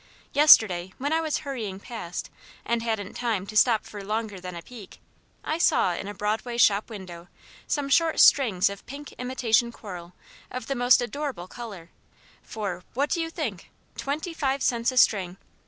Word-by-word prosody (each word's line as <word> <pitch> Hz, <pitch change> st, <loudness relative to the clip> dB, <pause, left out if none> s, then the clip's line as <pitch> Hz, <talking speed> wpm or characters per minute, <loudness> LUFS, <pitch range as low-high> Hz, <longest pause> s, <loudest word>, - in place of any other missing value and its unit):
Yesterday, 205 Hz, -, +6 dB
when 285 Hz, +4 st, -1 dB
I 325 Hz, -, +2 dB
was 315 Hz, -2 st, -1 dB
hurrying 220 Hz, -9 st, -4 dB
past 200 Hz, -6 st, -6 dB, 0.3 s
and 235 Hz, 0 st, 0 dB
hadn't 220 Hz, -4 st, -3 dB
time 225 Hz, -6 st, -2 dB
to 215 Hz, -, -9 dB
stop 220 Hz, 0 st, +4 dB
for 205 Hz, -1 st, -8 dB
longer 210 Hz, -1 st, -3 dB
than 180 Hz, -1 st, -7 dB
a 170 Hz, -, -8 dB
peek, 225 Hz, -7 st, -12 dB, 0.4 s
I 315 Hz, -, -2 dB
saw 300 Hz, -, +3 dB
in 190 Hz, -, -5 dB
a 205 Hz, -, -5 dB
Broadway 220 Hz, +4 st, -2 dB
shop 210 Hz, -2 st, +4 dB
window 180 Hz, -5 st, -9 dB, 0.4 s
some 290 Hz, -2 st, -1 dB
short 325 Hz, +3 st, +3 dB
strings 220 Hz, -10 st, +5 dB
of 200 Hz, 0 st, -5 dB
pink 285 Hz, +2 st, -8 dB
imitation 240 Hz, -2 st, +1 dB
coral 180 Hz, -6 st, -9 dB, 0.4 s
of 255 Hz, -2 st, -6 dB
the 275 Hz, -, -2 dB
most 245 Hz, -1 st, +4 dB
adorable 265 Hz, -8 st, -4 dB
colour, 195 Hz, -7 st, -9 dB, 0.5 s
for 195 Hz, -5 st, -5 dB
what 285 Hz, +3 st, 0 dB
do 335 Hz, -, +1 dB
you 325 Hz, -, -2 dB
think? 275 Hz, -, -5 dB, 0.3 s
Twenty 305 Hz, +5 st, -3 dB
five 275 Hz, -4 st, -1 dB
cents 235 Hz, 0 st, +1 dB
a 255 Hz, -, -7 dB
string! 190 Hz, -6 st, +3 dB
230 Hz, 170 wpm, -26 LUFS, 195-275 Hz, 0.5 s, Yesterday